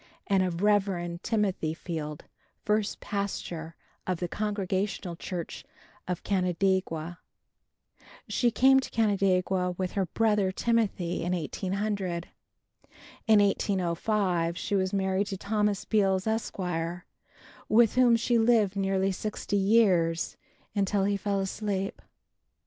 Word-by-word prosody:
and 195 -2 +2
of 180 0 -1
Rev. 190 -4 +1
Timothy 195 -8 0
Field, 155 -3 -5 0.4
first 210 0 0
pastor 175 -5 -4 0.3
of 185 -1 0
the 175 - -2
Congregational 195 -2 -2
church 170 0 -6 0.4
of 180 -1 -3
Canandaigua. 180 -3 0 1.1
She 240 - +2
came 265 +3 +5
to 265 - -5
Canandaigua 190 -4 +1
with 185 -1 -2
her 195 -3 -1
brother, 210 -1 +2
Timothy, 195 -5 0
in 175 +2 -1
1800. 185 +1 -2 1.0
In 215 -2 +6
1805 185 -2 0
she 190 - -3
was 190 -1 +1
married 195 0 0
to 195 - -4
Thomas 210 0 0
Beals, 195 -3 +2
Esq., 220 0 -2 1.1
with 225 0 +5
whom 250 -2 +5
she 235 +1 +2
lived 225 -4 +3
nearly 195 0 +1
sixty 205 +1 -3
years, 190 -5 +3 0.4
until 200 -1 +1
he 200 +1 +1
fell 200 0 -1
asleep. 195 0 -3
195 Hz, 115 wpm, -28 LUFS, 180-210 Hz, 1.1 s, In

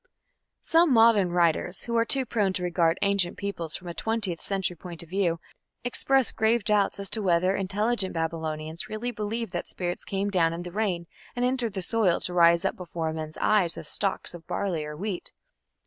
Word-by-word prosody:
Some 330 -1 +4
modern 225 -5 +5
writers, 175 +1 +1
who 235 - -3
are 230 0 +3
too 265 +2 +2
prone 205 -5 0
to 180 - -2
regard 170 -2 +2
ancient 200 -3 +2
peoples 175 -6 -3
from 175 - -7
a 170 - -4
twentieth 210 -5 -2
century 190 -3 -1
point 170 0 -7
of 165 - -16
view, 175 -3 0 0.4
express 265 +1 +2
grave 220 0 +2
doubts 205 -1 +1
as 200 - -4
to 220 - 0
whether 185 0 +2
"intelligent 200 +1 +1
Babylonians" 160 0 -3
really 220 +3 -3
believed 220 0 -3
that 175 - -4
spirits 175 -1 -4
came 200 +1 -2
down 165 -4 +2
in 170 +1 -5
the 175 - -7
rain 185 -4 -1 0.3
and 245 0 0
entered 250 -4 0
the 190 -2 -2
soil 200 -3 +2
to 180 - +1
rise 170 +1 +5
up - - 0
before 165 -3 -4
men's 155 -1 -6
eyes 195 -6 +2
as 160 - -7
stalks 195 +3 -1
of 170 -2 -11
barley 180 -6 -2
or 150 0 -7
wheat. 195 0 -3
190 Hz, 195 wpm, -27 LUFS, 170-215 Hz, 0.4 s, modern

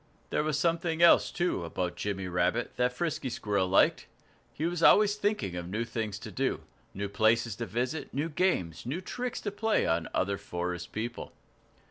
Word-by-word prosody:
There - - +2
was 155 -1 0
something 165 +1 +1
else, 170 - +7
too, 175 - -1
about 85 +1 -3
Jimmy 95 0 -3
Rabbit, 90 +6 0
that 125 0 +2
Frisky 140 0 -2
Squirrel 100 -5 0
liked; 95 - +3 0.4
he 155 - -3
was 175 0 -1
always 205 +3 +6
thinking 205 - -1
of 85 0 -5
new 110 +5 -2
things 110 -3 -3
to 110 0 -8
do - - -1 0.3
new 100 +1 -2
places 110 +1 +2
to 115 - -4
visit, 125 +6 -2
new 145 +4 -1
games, 150 - 0
new 135 +9 -3
tricks 245 +5 -4
to 205 - -3
play 220 +2 +1
on 80 0 0
other 100 +1 0
forest 90 0 -4
people. 115 +2 -5
115 Hz, 175 wpm, -29 LUFS, -, 0.4 s, else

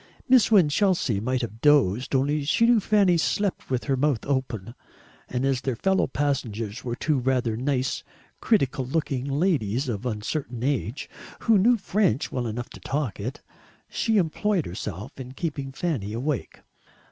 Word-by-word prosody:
Miss 255 -4 +5
Winchelsea 180 - +3
might 130 +4 -1
have 115 0 -6
dozed, 130 -4 +3
only 145 +3 +1
she 155 +10 +3
knew 235 -1 +5
Fanny 200 -4 +3
slept 200 +4 -1
with 130 -2 -1
her 135 - 0
mouth 135 -4 0
open; 125 -6 -2 0.6
and 125 +1 -1
as 135 -2 +1
their 130 -2 -2
fellow 190 +10 +1
passengers 115 -6 -2
were 120 -1 -3
two 145 +2 0
rather 125 -3 0
nice 130 +2 -1 0.4
critical 135 - +1
looking 135 -1 -2
ladies 140 - 0
of 120 0 -3
uncertain 120 +2 -3
age 130 -2 -1 0.3
who 225 -3 +4
knew 235 +5 +4
French 195 - 0
well 125 -2 -2
enough 120 +2 -5
to - - -11
talk 135 -6 -3
it 120 +7 -5 0.5
she 225 -1 +1
employed 190 +1 +1
herself 105 - -6
in 130 0 -7
keeping 140 -3 -4
Fanny 135 - -2
awake. 130 +2 -3
135 Hz, 155 wpm, -25 LUFS, 120-160 Hz, 0.6 s, Miss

